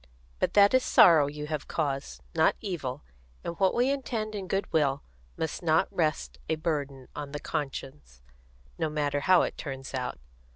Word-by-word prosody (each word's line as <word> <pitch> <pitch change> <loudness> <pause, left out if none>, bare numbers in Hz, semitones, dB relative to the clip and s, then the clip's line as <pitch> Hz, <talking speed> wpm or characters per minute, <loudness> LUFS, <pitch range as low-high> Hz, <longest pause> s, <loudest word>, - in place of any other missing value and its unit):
But - - 0
that 200 +1 +7
is 260 - +5
sorrow 160 -5 +6
you 150 +1 -5
have 150 -1 -4
caused, 135 - -3
not - - +3
evil; 140 - -4 0.4
and 170 - -3
what 190 -1 +3
we 250 +3 +3
intend 230 -6 -3
in 195 -3 -5
goodwill 155 -8 0 0.3
must 160 -2 -3
not 160 -2 +2
rest 155 - -1
a - - +2
burden 145 -5 -3
on 145 -1 -6
the 145 - -3
conscience, 130 - -5 0.6
no 160 -2 0
matter 145 -1 0
how 185 +5 +5
it - - -4
turns 135 -2 -6
out. 125 -1 -3
150 Hz, 165 wpm, -28 LUFS, 135-175 Hz, 0.6 s, that